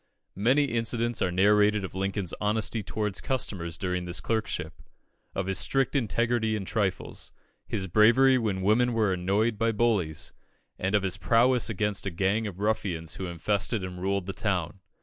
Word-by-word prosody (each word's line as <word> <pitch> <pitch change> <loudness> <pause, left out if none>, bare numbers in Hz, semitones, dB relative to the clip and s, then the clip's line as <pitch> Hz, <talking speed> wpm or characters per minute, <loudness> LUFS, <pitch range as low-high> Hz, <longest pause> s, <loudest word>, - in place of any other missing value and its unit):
Many 130 +8 +4
incidents 120 -2 -1
are - - +2
narrated 105 +2 +3
of - - -9
Lincoln's 95 -1 -2
honesty 110 +1 0
towards 105 -1 -2
customers 90 -10 -3
during 90 0 -2
this 85 0 -2
clerkship 110 -1 -3 0.5
of 95 - -1
his 95 -1 -1
strict 135 0 +1
integrity 115 -1 +1
in 100 -3 -4
trifles 95 -2 -2 0.4
his 95 - -2
bravery 120 +8 +5
when 100 -5 -1
women 120 +5 +3
were 110 -4 +2
annoyed 100 +5 0
by 115 0 +2
bullies 105 -9 0 0.5
and 95 +2 0
of 100 - +2
his 95 0 -1
prowess 120 +3 +3
against 105 -1 0
a - - +1
gang 95 +5 0
of 95 -4 -7
ruffians 95 -6 -1
who 95 - -4
infested 100 +5 -1
and 90 -1 -6
ruled 100 0 -1
the 95 - -4
town. 95 -4 -2
105 Hz, 165 wpm, -27 LUFS, 95-115 Hz, 0.5 s, bravery